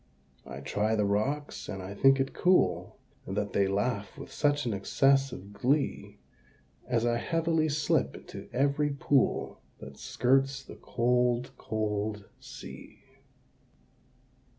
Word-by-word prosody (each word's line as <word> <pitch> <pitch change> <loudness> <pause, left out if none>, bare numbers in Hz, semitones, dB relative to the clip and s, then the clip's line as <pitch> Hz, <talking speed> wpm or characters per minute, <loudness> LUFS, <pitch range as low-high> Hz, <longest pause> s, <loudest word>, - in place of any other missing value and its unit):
I 70 0 -7
try 105 +9 0
the 105 -1 +2
rocks, 135 +9 -1
and 95 - -4
I 95 +2 -6
think 135 +6 +5
it 135 0 -1
cool 180 0 +2 0.3
That 100 +1 -2
they 100 -1 +3
laugh 100 0 -1
with - - -9
such 145 -1 +1
an 115 - 0
excess 135 +7 +2
of 100 -3 -9
glee, 140 +7 0 0.7
As 120 -1 +1
I 120 0 +2
heavily 165 +3 +1
slip 150 +1 +1
into - - -10
every 140 +3 +1
pool 140 -1 +1 0.2
That - - -11
skirts 135 +1 +1
the - - -11
cold 125 +1 +1
cold 105 -1 -2
Sea. - - -11
125 Hz, 125 wpm, -29 LUFS, 105-140 Hz, 0.7 s, think